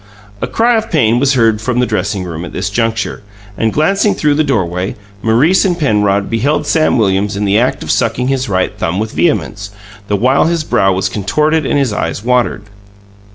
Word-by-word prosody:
A - - -1
cry 235 +1 +2
of 220 - -3
pain 120 - +2
was 140 +1 +2
heard 115 -3 +2
from 125 +2 -2
the 125 - +3
dressing 100 -3 -2
room 85 -2 -6
at - - -8
this 95 +2 -3
juncture, 115 +1 -2 0.3
and, 110 +2 0
glancing 195 - +1
through 150 -1 +1
the 155 +2 +2
doorway, 95 - -1 0.3
Maurice 125 +12 +3
and 180 -3 0
Penrod 105 - +1
beheld 125 +7 0
Sam 155 -5 +2
Williams 100 -1 0
in 105 - -1
the 100 +2 +3
act 125 - 0
of - - -2
sucking 125 +1 0
his 130 -3 -1
right 95 +2 -1
thumb 90 -3 -2
with 110 +1 -2
vehemence, 105 - -1 0.4
the 105 - 0
while 130 +7 +2
his 165 -1 0
brow 95 -9 +2
was 95 +1 0
contorted 150 +11 0
and - - +1
his 135 -6 0
eyes 105 - -3
watered. 125 -3 0
115 Hz, 200 wpm, -14 LUFS, 100-145 Hz, 0.4 s, the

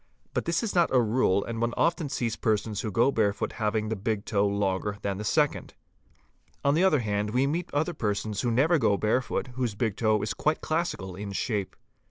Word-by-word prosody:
But - - -1
this 170 +6 0
'is 220 - -2
not 175 -2 +3
a 130 - +5
rule, 110 -4 +2
and 115 -1 -4
one 120 0 0
often 170 -3 +1
sees 115 -4 -1
persons 110 -1 -1
who 110 - -3
go 115 +6 +3
barefoot 105 -4 0
having 110 -1 -1
the 110 - -1
big 105 +1 -3
e - - -3
longer 100 0 +1
than 100 -1 -2
the - - -4
second. 145 +6 0 0.9
On 140 - +4
the 165 +5 +3
other 155 -8 +4
hand 105 -1 -1
we 125 +5 +2
meet 160 +5 -2
other 155 +4 0
persons 105 -5 -2
who 120 - 0
never 150 +8 +3
go 105 -5 +3
barefoot, 125 +4 0
whose 125 -5 -2
big 110 -2 -1
toe 110 -2 +2
is 110 +1 -1
quite 155 +6 0
classical 155 - -2
in 100 +1 -6
shape. 100 -2 -2
110 Hz, 210 wpm, -27 LUFS, 105-140 Hz, 0.9 s, a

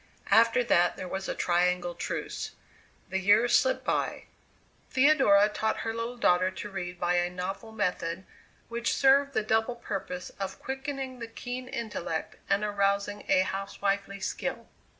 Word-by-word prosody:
After 230 +3 +5
that 175 -6 +3
there 185 - -5
was 190 +1 -4
a - - -2
triangle 175 0 +1
truce. - - -4 0.6
The 190 - 0
years 210 +5 +5
slipped - - +2
by. - - -1 0.7
Theodora 260 -8 +5
taught 220 +1 -1
her 225 - -2
little 230 +2 -4
daughter 185 -4 +3
to 190 +2 -7
read 180 -2 -5
by 175 0 +1
a 175 0 +1
novel 190 +5 -5
method 185 -4 -2 0.4
which 235 0 -1
served 275 +1 +4
the - - +2
double 225 +3 +1
purpose 190 -5 -5
of 195 -1 -4
quickening 265 -1 -5
the 230 - -5
keen 245 +2 -6
intellect 220 -10 -4
and 200 +1 +2
arousing 200 0 0
a 190 -1 +5
housewifely 195 +1 -2
skill. - - -3
205 Hz, 150 wpm, -29 LUFS, 185-235 Hz, 0.7 s, After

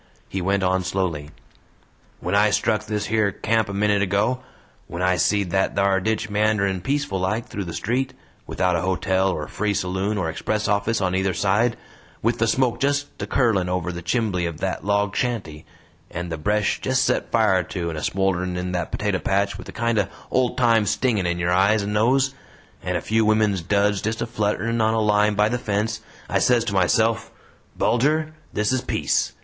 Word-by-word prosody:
He 95 - -4
went 100 +2 +1
on 95 0 +1
slowly: 90 -6 -2 0.9
"When 90 - -2
I 105 +1 +4
struck 110 0 0
this 105 0 -3
yer 110 -2 +3
camp 110 +2 0
a - - -4
minit 105 0 +2
ago; 100 +6 +1 0.5
when 85 +2 -4
I 90 0 +3
seed 100 +1 +1
that 95 +1 +1
thar 100 -1 +3
ditch 110 +3 -1
meanderin' 105 -3 +1
peaceful 135 -4 -1
like 105 +5 -1
through 100 - -5
the 85 - -6
street, 130 +2 -1 0.3
without 90 -1 0
a 85 - 0
hotel 95 +1 +1
or 75 -5 -3
free 105 -1 -1
saloon 95 +4 -1
or 90 -5 -1
express 105 +6 -2
office 105 +2 +1
on 90 -1 0
either 95 0 0
side; 105 +4 +1 0.5
with 115 +2 +1
the 115 - +2
smoke 120 0 +1
just 145 +1 +1 0.2
a - - -3
curlin' 105 -9 +1
over 90 -1 -1
the 85 0 -6
chimbley 95 -4 0
of 85 -2 -6
that 95 +2 -3
log 100 0 0
shanty, 100 -12 -3 0.4
and 85 0 -5
the 80 - -3
bresh 105 +5 0
just 130 0 +1
set - - 0
fire 110 -5 +3
to 85 -1 -4
and 80 - -6
a - - -7
smolderin' 90 0 0
in 90 0 -3
that 90 -2 -2
potato 100 -3 -1
patch 100 +1 0
with - - -9
a - - -6
kind 115 -1 0
o' 100 - +1 0.2
old 125 -1 +1
time 115 -4 +3
stingin' 105 -3 +1
in 85 0 -1
your 90 0 0
eyes 100 +3 +3
and 105 +1 -3
nose, 130 +5 +2 0.5
and - - -1
a - - -4
few 110 +1 +1
women's 105 -3 +2
duds 100 +2 +1
just 110 +1 -2
a - - -1
flutterin' 115 +1 -1
on 110 +1 +2
a - - +2
line 105 0 +3
by 105 +1 +3
the 120 +2 -1
fence, 105 0 -2 0.3
I - - +1
says 120 -2 +3
to 105 - -2
myself: 110 +4 +2 0.5
'Bulger 155 +6 +1 0.2
this 105 +2 0
is 130 -1 +1
peace! - - 0
105 Hz, 200 wpm, -23 LUFS, 95-110 Hz, 0.9 s, I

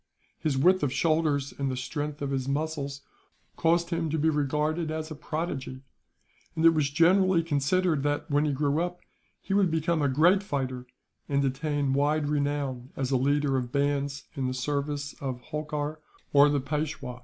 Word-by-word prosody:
His 150 -4 0
width 185 +7 +4
of 145 - 0
shoulders 150 -1 +1
and 135 -1 0
the 130 - -3
strength 145 +2 -4
of 140 - -2
his 135 -1 -2
muscles 140 -1 -2 0.5
caused 170 +1 +2
him 165 -1 -1
to 160 - -1
be 160 +1 +2
regarded 150 +3 0
as 155 0 -4
a - - -5
prodigy; 145 -4 -4 0.7
and 160 0 +1
it 165 - +9
was 155 -3 +1
generally 175 +3 +4
considered 160 +1 +1
that, 145 +1 -1
when 145 +1 +2
he 150 - +1
grew 145 +2 +1
up, 175 0 -3 0.4
he - - -3
would 195 -2 +4
become 160 0 0
a 140 - +2
great 170 +9 +4
fighter, 130 -8 -3 0.4
and 140 -1 +2
attain 140 0 -1
wide 145 +1 +1
renown 140 -4 -1
as 135 -1 -2
a - - +3
leader 140 +1 +2
of 125 -2 -3
bands 140 0 0
in 135 -3 -1
the 130 - -2
service 145 +2 -2
of 130 -3 -3
Holkar, 150 +2 -4 0.3
or 145 +1 +7
the 145 -1 +1
Peishwa. 140 -3 -4
145 Hz, 180 wpm, -28 LUFS, 140-160 Hz, 0.7 s, it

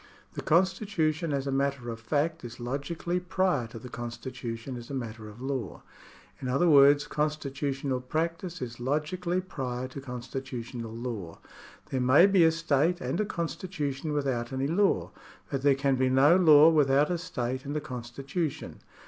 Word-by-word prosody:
The - - -5
constitution 170 -2 +1
as 140 -1 -1
a 140 - -1
matter 135 -3 -1
of 115 - -7
fact 150 +7 -1
is 120 +1 -8
logically 145 +8 -2
prior 180 -8 0
to 115 - -10
the 115 - -9
constitution 120 0 -6
as 120 -1 -9
a 140 - -4
matter 110 -3 -6
of 105 +2 -13
law. 130 -7 -4 0.6
In 130 - -3
other 135 +8 +2
words 145 -1 +6
constitu 150 -2 -2
tional 135 -2 -3
practice 165 +1 -2
is 120 -1 -7
logically 170 +7 -1
prior 130 -8 -4
to 135 +2 -8
constitutional 125 -2 -6
law. 115 -7 -5 0.5
There 130 - 0
may 130 +8 +6
be 195 -3 +5
a 160 - +6
state 165 +1 +1
and 195 - -1
a - - 0
constitution 165 -5 -3
without 135 -5 -1
any 135 0 -1
law, 190 +7 +1 0.4
but 135 - -1
there 140 0 +4
can 135 -1 +1
be 130 0 +2
no 135 +6 +6
law 160 -4 +8
without 145 0 +3
a 175 - -1
state 130 -7 -3
and 145 +2 -3
a - - +1
constitution. 135 +3 -5
140 Hz, 165 wpm, -28 LUFS, 125-160 Hz, 0.6 s, law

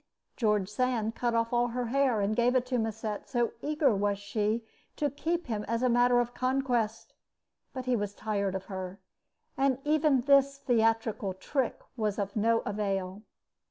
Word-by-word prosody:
George 210 -5 +1
Sand 225 0 0
cut 240 0 -1
off 230 +1 0
all 240 0 +3
her 245 +1 -2
hair 260 -4 +2
and 205 +2 0
gave 245 +2 +3
it 255 -1 +2
to 250 -1 -1
Musset, 220 -1 -3
so 240 -3 +1
eager 295 -4 +2
was 200 0 0
she 210 +2 -1 0.3
to 290 -2 0
keep 335 +5 -2
him 215 -4 -3
as 230 +3 -1
a 255 - +3
matter 245 +1 +4
of 240 0 -1
conquest; 250 -4 -1 0.6
but 260 -1 -6
he 255 -1 +2
was 205 -2 -3
tired 200 -3 -1
of 190 0 -4
her, 190 0 -6 0.6
and 270 -2 +2
even 300 -3 +3
this 275 +1 +4
theatrical 225 -6 +1
trick 265 +6 -2 0.2
was 210 -3 -1
of 200 -1 -3
no 230 +2 +2
avail. 195 -1 -2
230 Hz, 170 wpm, -29 LUFS, 210-255 Hz, 0.6 s, matter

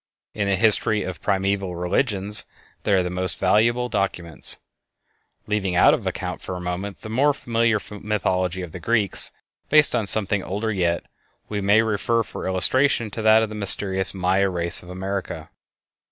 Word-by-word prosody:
In 105 -2 -2
the 100 - +1
history 105 +1 +6
of 95 -3 -7
primeval 95 -2 -1
religions 100 +3 0 0.4
they 105 - 0
are 95 -1 +3
the 90 - -4
most 90 0 +1
valuable 120 +3 +2
of 125 - -8
documents. 90 -6 0 0.9
Leaving 100 -4 -2
out - - +5
of - - -3
account - - -5
for 95 - -6
the - - -6
moment 90 +3 -5
the - - -9
more 140 +6 +1
familiar 115 -3 0 0.2
mythology 95 -3 -2
of 85 - -8
the 90 - -8
Greeks, 105 +2 0 0.4
based 155 -1 +5
on 110 -4 -1
something 100 -1 0
older 105 +4 -3
yet, 85 -3 -1 0.5
we 105 -1 -3
may 100 +3 +3
refer 115 +2 0
for - - -7
illustration 115 +4 +1
to 110 - -6
that 110 0 +5
of 110 - -3
the - - -8
mysterious 95 -2 +2
Maya 95 +1 0
race 85 -1 +2
of 90 - -15
America. 95 -3 -6
100 Hz, 170 wpm, -22 LUFS, 90-110 Hz, 0.9 s, history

